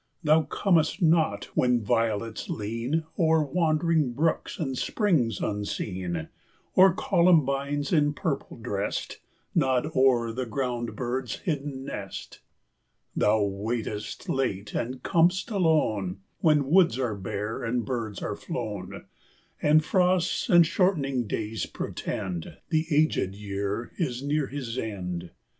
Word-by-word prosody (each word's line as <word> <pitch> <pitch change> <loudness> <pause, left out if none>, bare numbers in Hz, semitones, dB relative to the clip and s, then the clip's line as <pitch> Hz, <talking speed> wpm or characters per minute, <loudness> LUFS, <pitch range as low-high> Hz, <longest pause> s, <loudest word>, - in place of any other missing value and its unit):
Thou 155 +1 +5
comest 160 +2 +1
not 160 -2 +3
when 125 -1 +3
violets 115 -1 -1
lean 115 +9 -2 0.2
O'er 160 -2 +4
wandering 155 -2 +1
brooks 160 +6 0
and 135 -5 -2
springs 140 - +1
unseen, 95 -5 -3 0.5
Or 190 +1 +7
columbines, 145 -5 +2
in 145 -2 +3
purple 155 -6 -3
dressed, 105 -3 -3 0.3
Nod 130 +4 +2
o'er 125 -3 +4
the 125 +2 -3
ground 120 0 -2
bird's 125 0 -2
hidden 145 -4 -3
nest. 100 -7 -7 0.8
Thou 105 0 +3
waitest 105 +1 -3
late 105 -7 -1
and 125 +2 -3
com'st 180 +6 +2
alone, 110 - +1 0.2
When 150 -3 +3
woods 170 -9 +5
are 125 -4 -1
bare 105 +2 -4
and 120 0 -1
birds 115 -5 -3
are 105 - -2
flown, 105 - -5 0.6
And 155 +1 +4
frosts 180 +2 +2
and 175 -3 +7
shortening 150 - +1
days 110 +1 -3
portend 90 -4 -4
The 160 -1 +1
aged 150 - +2
year 100 +2 -3
is 130 -6 -1
near 145 0 0
his 130 -3 -4
end. 90 -5 -4
130 Hz, 120 wpm, -27 LUFS, 110-155 Hz, 0.8 s, Or